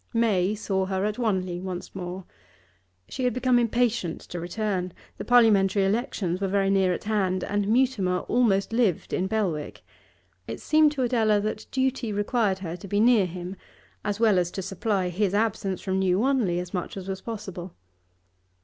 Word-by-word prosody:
May 210 -4 +2
saw 190 -3 -1
her 190 0 -1
at 210 +2 -2
Wanley 185 -6 -1
once 185 -1 -6
more. 185 0 -6 0.8
She 260 - -5
had 250 -1 +1
become 255 -1 +3
impatient 235 -6 0
to 175 - -7
return. 185 0 -2 0.3
The - - -3
Parliamentary 205 -5 +4
elections 195 -4 -1
were 195 - +1
very 195 0 +1
near 190 -2 +3
at 180 - -3
hand, 190 -4 0
and 205 0 -1
Mutimer 215 -6 +2
almost 225 -4 +1
lived 225 -8 +1
in 185 - 0
Belwick; 190 -8 -2 0.6
it - - -5
seemed 310 -1 +4
to 270 -3 -1
Adela 220 -4 +2
that 215 +1 -4
duty 260 -3 -1
required 205 -1 0
her 165 0 -4
to 190 - -10
be 205 +2 0
near 225 -4 +5
him, 180 +2 -6 0.5
as 205 0 -2
well 215 -5 +4
as 175 -1 0
to 190 - -4
supply 195 0 -1
his 195 +2 0
absence 205 -3 0
from 190 -1 -1
New 185 -1 +2
Wanley 235 -7 +1
as 180 +1 -5
much 180 +1 -4
as 190 -1 -7
was 190 -1 -4
possible. 190 -6 -7
200 Hz, 175 wpm, -26 LUFS, 185-225 Hz, 0.8 s, near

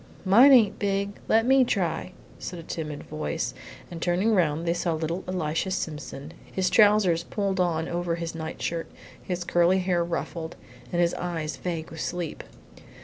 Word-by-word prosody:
"Mine 235 +9 +8
ain't 225 -6 +5
big; 200 0 -1
let 225 +1 +4
me 265 +1 +6
try," 190 -9 -1 0.3
said 180 - -6
a 165 - -8
timid 155 -3 -5
voice, 155 +2 -3 0.4
and 165 -1 -7
turning 185 +6 +2
round, 165 -3 +1
they 170 - +3
saw 170 -1 -1
little 165 +3 -3
Elisha 180 -1 -1
Simpson, 155 -4 -5 0.2
his 185 -1 0
trousers 205 -4 +5
pulled 195 -1 -2
on 165 -2 +1
over 170 -1 -1
his 170 -1 -4
night 160 -1 -6
shirt, 165 -1 -3 0.3
his 180 -1 -3
curly 175 +1 +3
hair 180 -2 +1
ruffled, 170 -1 -4 0.4
his 175 -1 +2
eyes 165 -4 -3
vague 165 +1 -4
with 160 - -6
sleep. 175 -3 -4
175 Hz, 160 wpm, -26 LUFS, 165-190 Hz, 0.4 s, Mine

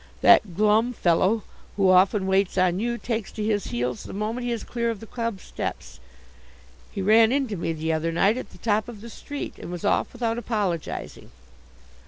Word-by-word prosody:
That 190 -6 +5
glum 215 +4 +3
fellow 190 +3 +2 0.3
who 195 -2 +4
often 190 +2 +4
waits 190 0 +1
on 185 0 +2
you 235 +2 -1
takes 225 -3 -3
to 215 - -4
his 210 -2 0
heels 125 0 -2
the - - -9
moment 220 +5 -3
he - - -1
is 230 -2 -3
clear 235 -1 -2
of 225 -3 -3
the 225 - -9
club 230 -3 -4
steps. - - -6 0.9
He 195 - -4
ran 220 +3 +5
into 265 -6 0
me 165 -2 -2
the 160 0 -2
other 160 +1 -1
night 195 +6 +3
at 255 - -6
the - - -15
top 215 +3 0
of 220 -4 -10
the 230 +1 -9
street, 285 +5 -7
and - - -8
was 175 +1 -5
off - - +1
without 235 -1 -2
apologizing." 205 -8 -3
210 Hz, 195 wpm, -25 LUFS, 185-230 Hz, 0.9 s, That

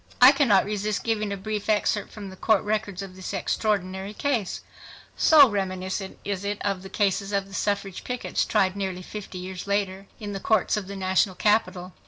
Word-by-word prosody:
I 250 +2 +10
cannot 255 -9 +4
resist 210 0 -2
giving 215 -2 -1
a 200 - -2
brief 210 +1 -4
excerpt 210 -1 +1
from 200 -3 -8
the - - -10
court 215 +1 +2
records 205 -2 -2
of 190 -1 -10
this 185 -1 -5
extraordinary 195 -1 -1
case, 240 -9 -1 0.5
so 300 -3 +7
reminiscent 190 -2 -3
is 200 -1 -2
it 205 0 -2
of 195 -2 0
the 190 - -9
cases 200 0 0
of 200 -1 0
the 195 - -14
suffrage 200 -1 -2
pickets 250 -1 -1
tried 190 -3 +1
nearly 190 -2 -3
fifty 200 -1 -8
years 185 +1 -6
later 195 -1 -1
in 205 -2 -5
the 195 - -4
courts 215 0 +2
of 205 -3 -4
the 200 - -6
national 190 0 +1
capital. 190 -4 +1
200 Hz, 190 wpm, -25 LUFS, 190-210 Hz, 0.5 s, I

